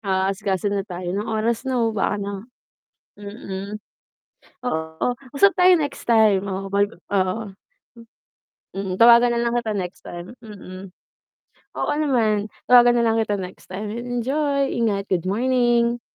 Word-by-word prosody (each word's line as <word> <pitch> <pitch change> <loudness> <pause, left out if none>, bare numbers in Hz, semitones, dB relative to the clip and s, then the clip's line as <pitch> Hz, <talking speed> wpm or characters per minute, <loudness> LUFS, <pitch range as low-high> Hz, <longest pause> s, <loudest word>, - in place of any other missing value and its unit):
Aasikasona 195 0 -1
tayo, 180 -1 -5
anong 205 +2 -3
oras 225 +1 0
na 260 - 0 0.2
baka 210 -1 0
na 200 0 -4 0.9
mm. 200 -1 -7 0.9
Oo 160 -6 -2 0.3
usap 395 +7 +6
tayo 365 0 +5
next 290 -5 -5
time, 215 -4 +4
oo, 195 0 -4
bagu 200 0 +1 0.2
oo. 195 +2 -1 0.4
M 230 - -13 0.7
Mm 195 -1 -3
tawagan 235 +1 +7
na - - 0
lang 235 - 0
kita 235 -2 -1
next 180 -1 -5
time, 175 +5 -9
mm. 195 -4 -10 0.9
Oo - - 0
naman 230 -8 +1 0.2
tawagan 245 -1 +6
na 235 - +2
lang 225 0 +2
kita 210 -2 0
next 185 -1 -9
time, 205 +3 -5
enjoy 270 +4 -1
ingat, 210 -4 0
good 180 -1 0
morning. 240 +1 +1
215 Hz, 140 wpm, -22 LUFS, 195-240 Hz, 0.9 s, tawagan